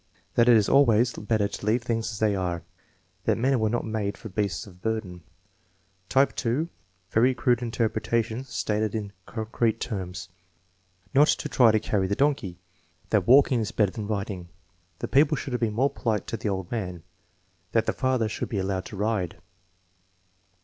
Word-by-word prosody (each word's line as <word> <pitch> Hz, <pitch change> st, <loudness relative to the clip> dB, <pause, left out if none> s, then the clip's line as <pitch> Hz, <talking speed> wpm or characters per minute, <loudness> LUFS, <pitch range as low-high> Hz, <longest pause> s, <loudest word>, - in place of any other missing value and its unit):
"That 120 Hz, +1 st, +4 dB
it 120 Hz, -, +8 dB
is 105 Hz, -, +2 dB
always 120 Hz, -3 st, +4 dB
better 105 Hz, -1 st, 0 dB
to 100 Hz, -, -7 dB
leave 115 Hz, +2 st, +2 dB
things 115 Hz, -1 st, -1 dB
as 110 Hz, -, -6 dB
they 105 Hz, -1 st, +2 dB
are." 90 Hz, -3 st, -2 dB, 0.6 s
"That -, -, +2 dB
men 130 Hz, +2 st, +2 dB
were 110 Hz, -1 st, +1 dB
not 120 Hz, +2 st, -1 dB
made 110 Hz, -2 st, -2 dB
for 110 Hz, -, -9 dB
beasts 95 Hz, -2 st, -2 dB
of 90 Hz, -3 st, -16 dB
burden." 110 Hz, -5 st, -3 dB, 0.9 s
Type 135 Hz, +1 st, +3 dB, 0.4 s
(), 90 Hz, +1 st, -40 dB
very 125 Hz, +3 st, +3 dB
crude 120 Hz, +1 st, +2 dB
interpretations 115 Hz, +1 st, -1 dB
stated 105 Hz, 0 st, -1 dB
in 105 Hz, -2 st, -4 dB
concrete 110 Hz, 0 st, -1 dB
terms: 95 Hz, -6 st, -5 dB, 0.8 s
"Not 145 Hz, +3 st, +6 dB
to 150 Hz, -, +1 dB
try 125 Hz, -5 st, +5 dB
to 110 Hz, -, +3 dB
carry 100 Hz, -2 st, 0 dB
the 100 Hz, -, 0 dB
donkey." 135 Hz, -11 st, 0 dB, 0.5 s
"That 100 Hz, -4 st, +2 dB
walking 130 Hz, -1 st, +6 dB
is 110 Hz, 0 st, -2 dB
better 105 Hz, -5 st, +2 dB
than 105 Hz, 0 st, -5 dB
riding." 100 Hz, -4 st, -4 dB, 0.5 s
"The -, -, -4 dB
people 145 Hz, +2 st, +4 dB
should 135 Hz, -, -5 dB
have 125 Hz, -, 0 dB
been 110 Hz, -2 st, 0 dB
more 135 Hz, +5 st, +2 dB
polite 110 Hz, -5 st, -1 dB
to 115 Hz, -, -2 dB
the 105 Hz, -, -2 dB
old 95 Hz, -3 st, -3 dB
man." 90 Hz, -8 st, -4 dB, 0.7 s
"That 115 Hz, -1 st, +3 dB
the -, -, 0 dB
father 130 Hz, -4 st, +1 dB
should 110 Hz, -, -4 dB
be 110 Hz, -, -2 dB
allowed 95 Hz, -1 st, -1 dB
to -, -, -8 dB
ride." 105 Hz, -5 st, -1 dB
110 Hz, 175 wpm, -26 LUFS, 100-120 Hz, 0.9 s, it